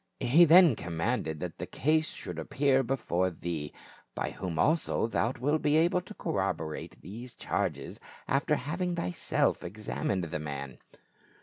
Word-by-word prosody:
He 155 +8 +6
then 170 -4 +7
commanded 80 -3 -2
that 90 -2 -5
the - - -4
case 155 +2 +1
should - - -5
appear 135 -1 +2
before 115 -8 0
thee, 80 -3 -5 0.4
by - - -2
whom 90 -4 -5
also 155 - +2
thou 115 +1 0
wilt 145 +5 +1
be 150 +1 +3
able 175 +3 +3
to 185 +4 -11
corroborate 90 -5 -3
these 120 +6 -8
charges, 80 -9 -3 0.3
after 140 +2 +2
having 175 +6 -2
thyself 90 - 0
examined 100 -1 -2
the 80 -2 -3
man." 70 -3 -6
110 Hz, 140 wpm, -30 LUFS, -, 0.4 s, then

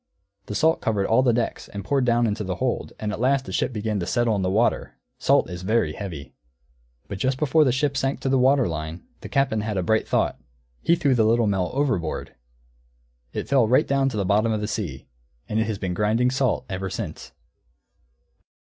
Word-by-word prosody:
The 105 - -5
salt 160 +6 +2
covered 105 -3 0
all 115 +5 +3
the 130 -2 +3
decks 115 0 -2
and 100 -1 -7
poured 135 +2 +1
down 120 0 +3
into 105 -1 -1
the 95 -2 -3
hold, - - -2
and 105 -1 -2
at 105 - -5
last 135 +2 +2
the - - -7
ship - - 0
began 105 -2 -2
to 85 - -3
settle 120 -2 +1
in 100 - -1
the 90 - 0
water; 110 +5 0 0.2
salt - - +3
is 90 0 -7
very 110 +5 +1
heavy. 85 -8 -7 0.7
But 95 - -6
just 130 +4 0
before 155 +2 +3
the 130 - +3
ship 140 +2 0
sank 135 +1 -1
to - - -2
the 135 0 +3
water 135 0 +4
line, 80 +1 -5 0.2
the - - -9
Captain 135 -6 +1
had 105 -1 -3
a 95 - 0
bright 110 +3 +1
thought: - - 0 0.4
he 170 - +3
threw 145 -6 +2
the 115 -3 +3
Little 115 +1 +3
Mill 95 -3 0
overboard! 110 - -1 1.0
It - - -4
fell 135 -5 +3
right 125 +4 +4
down 135 -1 +2
to 115 - -5
the 100 - 0
bottom 105 +4 +2
of 110 - 0
the 105 - -3
sea. 105 -6 -4 0.4
_And 110 - -1
it 110 - +1
has 110 -3 -2
been 95 -2 -3
grinding 110 +6 +1
salt 130 -2 0
ever 95 -1 -4
since. - - -6
110 Hz, 215 wpm, -24 LUFS, 100-130 Hz, 1.0 s, water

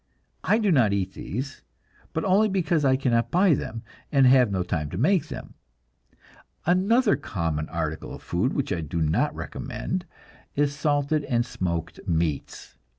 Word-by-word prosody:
I 215 - +3
do 210 -4 +2
not 120 -10 +4
eat 95 -1 -1
these 130 +6 -5 0.5
but 160 - -2
only 200 +3 +4
because 175 -5 +1
I 130 -1 +4
cannot 120 -3 +1
buy 180 -1 +4
them, 115 -4 -4 0.3
and 135 -2 +5
have 125 -2 +6
no 95 -2 0
time 80 -4 -2
to 90 - -5
make 175 - +2
them. - - -8 1.1
Another 205 +7 +3
common 80 -4 -3
article 80 -2 -3
of - - -13
food 95 +10 0
which 135 -8 -1
I 85 - -2
do 80 +2 -3
not 80 0 +1
recommend 180 -1 -4 0.5
is 145 0 +1
salted 145 +1 +1
and 120 -3 +1
smoked 85 -9 -3
meats. 80 -4 -2
130 Hz, 155 wpm, -25 LUFS, -, 1.1 s, have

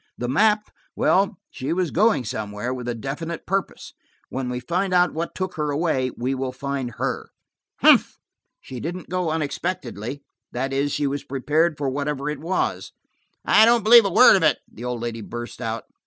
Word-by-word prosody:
The 120 - -3
map–well, 210 - +1
she 145 +3 -3
was 180 -2 -1
going 205 - +2
somewhere, 105 +3 -4
with 125 -1 -6
a 120 - -2
definite 150 +8 -5
purpose. 195 +1 -3 0.4
When 130 -1 -3
we 125 0 -3
find 180 +8 -1
out 180 0 +4
what 165 +2 -4
took 185 0 -3
her 150 -1 -1
away, 145 -4 0
we 125 +3 -1
will 130 -1 -3
find 130 -2 -4
her." - - -3 0.5
"Humph!" - - +5 0.4
"She 130 - -9
didn't 175 +4 -6
go 180 -1 -1
unexpectedly–that 135 - -4
is, 140 +1 0
she 145 - -1
was 140 +1 -2
prepared 150 +4 0
for 145 - -2
whatever 140 +1 -2
it 150 - -6
was." 175 +4 -2 0.5
"I - - +6
don't 235 -1 +5
believe 230 +1 +8
a - - +1
word 250 +7 +7
of 190 - +2
it," 155 -2 +3
the 120 - -10
old 125 -2 -3
lady 115 -1 -4
burst 120 +3 -7
out. 115 -1 -3
145 Hz, 175 wpm, -23 LUFS, 125-175 Hz, 0.5 s, believe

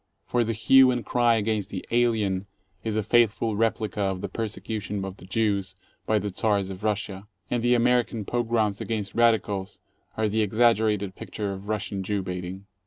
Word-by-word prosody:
For 120 -1 +1
the 115 0 -1
hue 130 +4 +6
and 125 -2 -1
cry 120 -1 +3
against 105 -2 -1
the 95 - -6
"alien" 110 -5 +1 0.4
is 110 -2 -2
a 110 - +1
faithful 115 0 +2
replica 110 -2 0
of 95 -2 -1
the 100 - -4
persecution 105 -1 -4
of 95 0 -7
the - - -13
Jews 100 -2 0 0.3
by 110 - +3
the 100 -1 -3
Czars 100 -4 +1
of 95 +2 -9
Russia, 105 -2 -2 0.3
and 120 - +1
the 120 +1 +3
American 120 -2 +1
pogroms 115 -4 0
against 105 -4 -3
radicals 110 -5 +1 0.4
are 110 0 +2
the 110 +1 +1
exaggerated 110 -2 +2
picture 100 +1 -5
of 95 +1 -9
Russian 105 -2 -2
Jew 100 +1 -2
baiting. 90 +1 -6
105 Hz, 175 wpm, -26 LUFS, 100-115 Hz, 0.4 s, hue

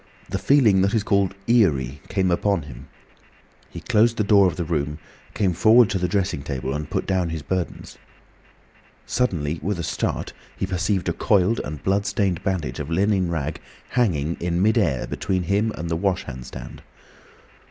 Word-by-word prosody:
The - - -2
feeling 115 -9 +4
that 100 +3 +1
is 110 - +1
called 100 -2 +1
"eerie" 70 - +2
came 95 -2 0
upon 95 -1 +1
him. 65 -2 -11 0.8
He - - -9
closed 115 0 +2
the 105 - +2
door 100 -2 +5
of 90 - -2
the 90 - -2
room, 75 -2 -2 0.4
came 95 -4 +1
forward 110 +6 +5
to 95 - 0
the 90 - 0
dressing 90 -5 -1
table, 65 -2 -4
and 75 +1 -4
put - - -2
down 95 -3 0
his 80 -2 -5
burdens. 90 +3 -4 1.1
Suddenly, 85 -11 -1
with 100 +4 -2
a 85 - -3
start, - - -2 0.2
he - - -1
perceived 95 0 -1
a 85 - +1
coiled 105 +1 +2
and 75 -1 -7
blood 100 +2 +1
stained 95 -3 0
bandage 80 -10 -2
of 75 0 -5
linen 95 +1 +1
rag 80 -2 -3 0.3
hanging 85 - 0
in 85 0 -1
mid 110 +3 +3
air, 70 - 0
between 95 -1 -2
him 100 +5 +1
and 85 - -4
the 80 - -1
wash 95 +2 0
hand 65 -5 -8
stand. - - -9
90 Hz, 180 wpm, -23 LUFS, 75-100 Hz, 1.1 s, door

